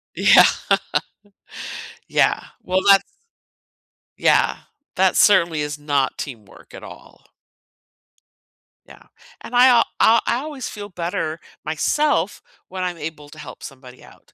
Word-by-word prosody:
Yeah. - - +6 1.6
Yeah, - - +2 0.2
well, 185 +1 0
that's 195 -1 +7 1.2
yeah, - - +2 0.4
that 190 0 +2
certainly 170 -6 +3
is 150 0 -5
not 145 -2 -1
teamwork 115 -8 -10
at - - -11
all. - - -14 1.6
Yeah, - - -16 0.4
and 245 - -8
I 250 +1 +7 0.3
I 230 +1 +5
I 235 - +1
always 285 -2 -6
feel 205 -1 -8
better 170 -3 -4 0.2
myself 200 - -1 0.3
when 185 0 -6
I'm 175 -2 -3
able 150 -1 -8
to 155 +1 -14
help 130 -4 -11
somebody 130 -2 -12
out. - - -20
170 Hz, 115 wpm, -20 LUFS, 150-205 Hz, 1.6 s, that's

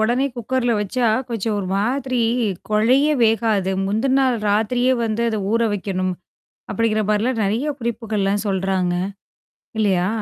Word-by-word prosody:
உடனே 240 +5 +2
குக்கர்ல 245 +1 0
வச்சா, 235 +4 0 0.2
கொஞ்சம் 225 -2 -2
ஒரு 195 - -3
மாதிரி 255 +3 -1 0.5
கொழைய 245 +7 +4 0.2
வேகாது. 220 -4 +2
முந்தன 230 +7 +1
நாள் 255 -2 +2
ராத்திரியே 245 +5 +2
வந்து 225 +1 -1
அத 215 -2 -2
ஊற 230 0 +2
வைக்கணும், 185 -2 -2 0.6
அப்படிங்கிற 215 -2 +1
மாரிலாம் 225 +3 +1
நெறைய 225 +9 0
குறிப்புகள்லாம் 215 -3 -1
சொல்றாங்க. 190 -2 0 0.8
இல்லையா? 190 -4 +2
220 Hz, 125 wpm, -21 LUFS, 200-240 Hz, 0.8 s, கொழைய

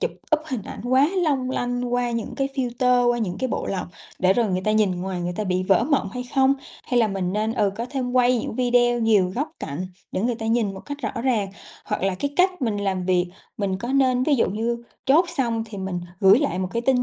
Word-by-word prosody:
chụp - - 0 0.3
up - - -9
hình 255 -8 -3
ảnh - - -8
quá 260 +4 +4
long 270 -5 +1
lanh 245 -1 -2
qua 245 -1 +1
những 230 -2 -3
cái 275 0 -1
filter, 250 -1 +2
qua 240 - 0
những 185 -5 -2
cái 260 - -1
bộ - - -2
lọc 190 -2 -2 0.3
để 185 +1 +4
rồi 235 +1 +2
người 185 0 0
ta 215 - +2
nhìn 215 -2 +3
ngoài 185 -1 -3
người 175 0 -2
ta 215 - -1
bị 185 -1 0
vỡ 195 +4 +3
mộng 280 -9 +1
hay 250 - -4
không? 270 0 +4 0.3
Hay 245 -1 +2
là 220 - +3
mình 190 -2 -2
nên, 215 +2 0
ừ, 210 -5 +1
có 235 - -2
thêm 255 -3 -2
quay 250 -1 +4
những 220 - -4
video 240 0 +3
nhiều 205 -5 +3
góc 285 +5 -1
cạnh 165 +7 -4 0.3
để - - -1
người 240 +2 +1
ta 225 -1 -5
nhìn 225 -4 +1
một 190 - -8
cách 285 0 -7
rõ 235 - -3
ràng. 225 -7 +1 0.4
Hoặc 210 - -3
là 195 0 +1
cái 285 +10 -2
cách 365 -4 +2
mình 220 -4 0
làm 195 -2 -1
việc 180 -1 +2 0.3
mình 195 -2 0
có 235 - -5
nên, 255 -2 +3
ví 290 +1 +3
dụ 235 - +2
như, 235 +3 -2 0.2
chốt 310 +7 +5
xong 230 -4 0
thì 210 -2 -8
mình 190 -2 -3 0.2
gửi 195 +3 +7
lại 280 -11 -1
một 185 -1 -1
cái 235 - -1
tin 255 -1 +3
235 Hz, 255 wpm, -23 LUFS, 195-255 Hz, 0.4 s, gửi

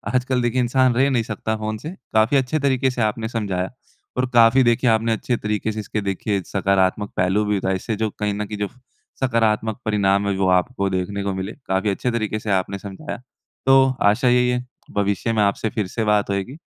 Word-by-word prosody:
आजकल 125 0 +1
देखिए 120 +1 +1
इंसान 130 +1 +3
रह 135 +3 +3
नहीं 120 -4 +1
सकता 110 0 -3
फ़ोन 110 0 -3
से, 150 - -7 0.2
काफ़ी 110 +6 +4
अच्छे 135 +4 0
तरीके 130 -2 +1
से 125 - -3
आपने 110 +1 0
समझाया 100 -5 -2 0.5
और 125 - +2
काफ़ी 115 +3 +6
देखिए 120 +1 +3
आपने 115 0 +2
अच्छे 120 +2 -1
तरीके 105 0 -2
से 110 - -5
इसके 105 0 -3
देखिए 100 0 -1
सकारात्मक 100 +1 +1
पहलू 95 +4 +2
भी 105 -1 +1
बताए। 95 0 0
इससे 110 +4 -3
जो 110 0 -1
कहीं 105 -1 0
न 105 +1 -3
कहीं 105 0 -6
जो 105 -1 -1 0.5
सकारात्मक 110 -2 +1
परिणाम 100 -1 +2
है 100 - 0
वो 95 -1 +1
आपको 100 -1 -3
देखने 95 +2 -2
को 100 -1 -1
मिले 95 +2 -4 0.2
काफ़ी 95 +2 +1
अच्छे 120 +5 -1
तरीके 110 -2 -2
से 105 -1 -3
आपने 95 +1 0
समझाया। 100 +9 -7 0.5
तो 135 0 +6 0.2
आशा 105 +5 +1
यही 125 0 +3
है 125 0 -1 0.3
भविष्य 100 +3 0
में 110 - +2
आपसे 100 +2 0
फिर 105 -5 -2
से 110 +4 -3
बात 105 -1 +2
होएगी 100 +7 -2
110 Hz, 210 wpm, -22 LUFS, 100-120 Hz, 0.5 s, काफ़ी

